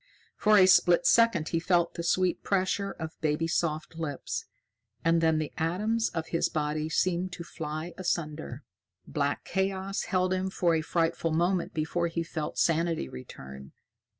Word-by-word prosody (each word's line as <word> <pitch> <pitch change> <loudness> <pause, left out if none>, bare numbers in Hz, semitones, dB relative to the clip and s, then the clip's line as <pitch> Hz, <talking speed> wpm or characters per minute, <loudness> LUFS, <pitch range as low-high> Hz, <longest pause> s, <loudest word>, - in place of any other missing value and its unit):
For 210 0 +4
a 185 - +8
split 180 -1 +5
second 230 -9 +4
he 165 - 0
felt 175 0 +2
the - - -4
sweet 180 +2 +1
pressure 195 +1 0
of 160 -4 -8
baby 155 +1 +1
soft 160 -1 -2
lips, 145 -4 -4 0.6
and 165 0 +4
then 160 -1 +3
the 155 -1 -3
atoms 210 +8 0
of 165 -1 -4
his 165 - +1
body 155 0 -2
seemed 180 +2 0
to 170 - -6
fly 160 0 -5
asunder. 155 -6 -3 0.4
Black 140 0 -1
chaos 190 0 -2
held 185 -1 +1
him 185 +1 -1
for 175 -2 +1
a 160 - +2
frightful 165 0 0
moment 175 +2 0
before 160 +2 0
he 170 0 -2
felt 155 -2 -5
sanity 165 - +1
return. 65 +1 -10
170 Hz, 155 wpm, -28 LUFS, 155-185 Hz, 0.6 s, a